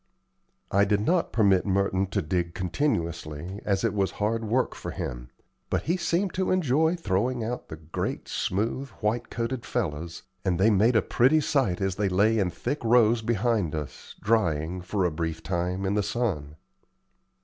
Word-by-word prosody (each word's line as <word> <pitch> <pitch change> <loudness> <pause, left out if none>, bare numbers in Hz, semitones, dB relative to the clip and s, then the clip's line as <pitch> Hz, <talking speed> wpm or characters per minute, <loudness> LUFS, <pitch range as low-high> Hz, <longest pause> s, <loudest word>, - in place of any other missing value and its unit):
I 100 +1 +4
did 100 0 +2
not 170 +10 +1
permit 100 -5 +4
Merton 95 -1 +1
to 95 - -1
dig 85 +1 -1
continuously, 85 - -2
as 100 0 0
it 115 -3 +1
was 100 -2 0
hard 110 +2 -1
work 125 +4 +1
for - - -7
him; - - -5 0.4
but - - 0
he 170 - +1
seemed 175 +2 0
to 185 0 0
enjoy 160 -1 +2
throwing 120 - 0
out 120 +3 -4
the - - -7
great, 80 +1 -4
smooth, 115 +8 -1
white 115 +3 0
coated 115 +1 -3
fellows, 85 -7 -3 0.2
and 90 -2 0
they 110 +4 +5
made 110 +4 +4
a 110 - +4
pretty 135 +6 +4
sight 135 - +1
as 95 -1 -1
they 105 -2 +1
lay 105 +4 +3
in 95 -3 +1
thick 120 - -4
rows 115 0 +4
behind 110 -6 0
us, 75 -3 -7
drying, 90 -5 +1
for 95 +1 -1
a 90 - +1
brief 80 +1 -3
time, 90 +1 -2
in 95 - +1
the 105 - +2
sun. 95 -9 -2
100 Hz, 170 wpm, -27 LUFS, 90-120 Hz, 0.4 s, they